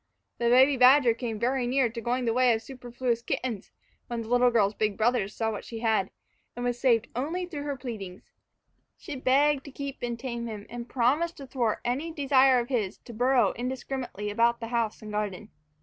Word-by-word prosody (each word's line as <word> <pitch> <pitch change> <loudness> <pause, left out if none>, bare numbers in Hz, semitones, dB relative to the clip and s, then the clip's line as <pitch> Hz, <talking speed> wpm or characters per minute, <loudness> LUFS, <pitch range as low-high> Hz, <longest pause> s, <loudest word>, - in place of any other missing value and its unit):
The 235 0 +2
baby 260 +3 +5
badger 255 -1 +6
came 230 -2 -4
very 245 +2 0
near 260 0 +2
to 230 +1 -6
going 245 +2 -1
the 230 - +1
way 250 0 +4
of 220 - -6
superfluous 245 -1 -3
kittens 235 -3 -3 0.4
when 235 -1 -4
the 220 - -10
little 245 0 +4
girl's 215 -4 +2
big 210 -2 -1
brothers 220 -3 +1
saw 225 -1 -1
what 210 - -6
she 230 - -8
had, 220 -5 +1 0.5
and 245 +1 -4
was 245 0 -1
saved 235 -3 +2
only 325 +9 -2
through 320 -5 -6
her 285 -1 -2
pleading. 215 -8 -7 0.7
She 300 - -7
begged 275 +2 +2
to 280 - -9
keep 280 0 -6
and 240 -1 -3
tame 235 -1 -5
him, 210 -2 -7
and 240 0 -7
promised 285 +8 +1
to 275 - -8
thwart 250 -4 -1
any 275 +7 -1
desire 270 -4 +4
of 240 -1 -1
his 215 -7 -1
to 240 - -12
burrow 250 +2 +3
indiscriminately 250 -4 -4
about 235 +2 +2
the 230 -1 -6
house 230 -2 -1
and 215 - -7
garden. 210 0 -4
245 Hz, 200 wpm, -27 LUFS, 225-260 Hz, 0.7 s, badger